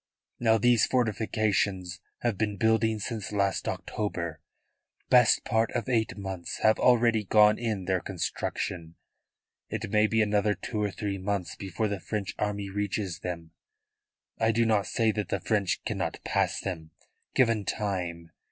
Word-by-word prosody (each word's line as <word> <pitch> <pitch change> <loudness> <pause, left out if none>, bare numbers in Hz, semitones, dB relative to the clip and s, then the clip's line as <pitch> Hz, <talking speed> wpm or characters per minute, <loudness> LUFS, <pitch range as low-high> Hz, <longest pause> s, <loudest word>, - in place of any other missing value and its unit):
Now 115 -1 +4
these 120 0 +4
fortifications 105 -6 0 0.2
have 120 -3 0
been 105 0 -1
building 110 +1 +2
since 105 0 -4
last 100 -2 0
October. 85 -7 -3 0.7
Best 125 -3 +5
part 110 +1 +2
of - - -2
eight 115 -5 0
months 95 -3 -5
have 110 0 +4
already 115 -3 +4
gone 105 +1 +5
in 110 -6 -2
their 95 0 +1
construction. 85 -2 -4 0.7
It - - -4
may 105 0 +4
be 110 0 +3
another 105 0 +1
two 110 -3 -4
or 105 - +1
three 100 0 -4
months 95 -2 -2
before 100 +3 -2
the 100 -1 -3
French 105 -2 -4
army 100 -1 -1
reaches 100 -3 -2
them. 85 -3 -6 0.9
I 110 0 +3
do 115 +1 +2
not 110 -3 +2
say 115 -1 +2
that 105 -1 -3
the 100 - 0
French 100 -2 0
cannot - - -2
pass - - 0
them, 80 -5 -5 0.5
given 115 -5 +3
time. 90 -6 -3
105 Hz, 150 wpm, -28 LUFS, 95-110 Hz, 0.9 s, Best